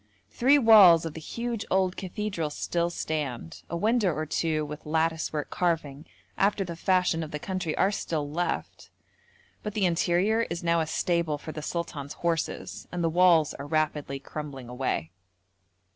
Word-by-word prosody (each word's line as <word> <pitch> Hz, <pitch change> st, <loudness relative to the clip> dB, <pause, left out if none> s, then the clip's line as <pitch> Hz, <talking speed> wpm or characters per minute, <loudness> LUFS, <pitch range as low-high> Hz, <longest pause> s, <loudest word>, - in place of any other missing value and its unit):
Three 270 Hz, +4 st, +4 dB
walls 205 Hz, -, +8 dB
of 160 Hz, -, -4 dB
the 160 Hz, -, -7 dB
huge 235 Hz, +5 st, -4 dB
old 190 Hz, -1 st, +2 dB
cathedral 190 Hz, -4 st, -3 dB
still 170 Hz, +3 st, -1 dB
stand, 145 Hz, -, -4 dB
a 170 Hz, -, -2 dB
window 215 Hz, 0 st, +2 dB
or 155 Hz, 0 st, -3 dB
two 155 Hz, 0 st, -1 dB
with 150 Hz, +1 st, -8 dB
lattice 160 Hz, +1 st, 0 dB
work 150 Hz, -2 st, -4 dB
carving 160 Hz, -4 st, -1 dB, 0.3 s
after 200 Hz, 0 st, +2 dB
the 170 Hz, -2 st, -6 dB
fashion 180 Hz, -1 st, +1 dB
of 155 Hz, -, -5 dB
the 150 Hz, -, -4 dB
country 185 Hz, 0 st, -3 dB
are 195 Hz, -, +3 dB
still 155 Hz, -7 st, -2 dB
left, 170 Hz, +5 st, -3 dB, 0.7 s
but 210 Hz, 0 st, -5 dB
the 205 Hz, -3 st, +2 dB
interior 180 Hz, +6 st, +2 dB
is 170 Hz, 0 st, -4 dB
now 170 Hz, 0 st, +2 dB
a 160 Hz, -, 0 dB
stable 170 Hz, -1 st, 0 dB
for 155 Hz, -, -8 dB
the 155 Hz, -, -6 dB
sultan's 150 Hz, -3 st, -4 dB
horses, 170 Hz, -1 st, -3 dB
and 175 Hz, -1 st, -2 dB
the 165 Hz, -, +2 dB
walls 170 Hz, -2 st, +4 dB
are 140 Hz, -, -8 dB
rapidly 150 Hz, -2 st, -1 dB
crumbling 135 Hz, -3 st, -7 dB
away. 125 Hz, -, -2 dB
165 Hz, 165 wpm, -27 LUFS, 150-185 Hz, 0.7 s, walls